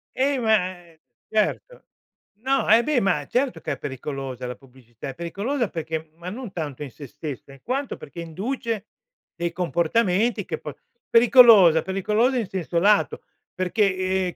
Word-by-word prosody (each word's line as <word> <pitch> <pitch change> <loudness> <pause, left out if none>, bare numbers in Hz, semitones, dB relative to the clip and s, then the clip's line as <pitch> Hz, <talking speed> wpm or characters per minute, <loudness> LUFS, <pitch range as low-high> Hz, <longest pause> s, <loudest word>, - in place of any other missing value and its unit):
Eh, 270 0 +1
ma 215 -5 +2 0.5
certo. 220 - -1 0.6
No, 270 +2 +1
eh 225 +2 +6
beh, 300 -2 +2
ma 180 -7 +1
certo 255 +1 0
che - - -3
è - - -7
pericolosa 135 -2 -5
la 125 - -5
pubblicità. 125 -1 -12
È 130 - -7
pericolosa 205 - -2
perché 160 -1 -5
ma 175 +2 -7
non 230 0 -7
tanto 150 -5 -5
in 140 - -8
se 140 +2 -10
stessa, 140 0 -8
in 135 - -15
quanto 270 +2 -3
perché 170 +4 -9
induce 220 - -4 0.5
dei 170 0 -2
comportamenti 185 +5 +1
che - - -4
po 150 - -8 0.3
pericolosa, 230 - +7
pericolosa 215 +7 +1
in 225 - -1
senso 180 -2 -2
lato, 205 +2 +2 0.3
perché, 185 0 0
ehm, 175 - -6
185 Hz, 155 wpm, -24 LUFS, 160-230 Hz, 0.6 s, pericolosa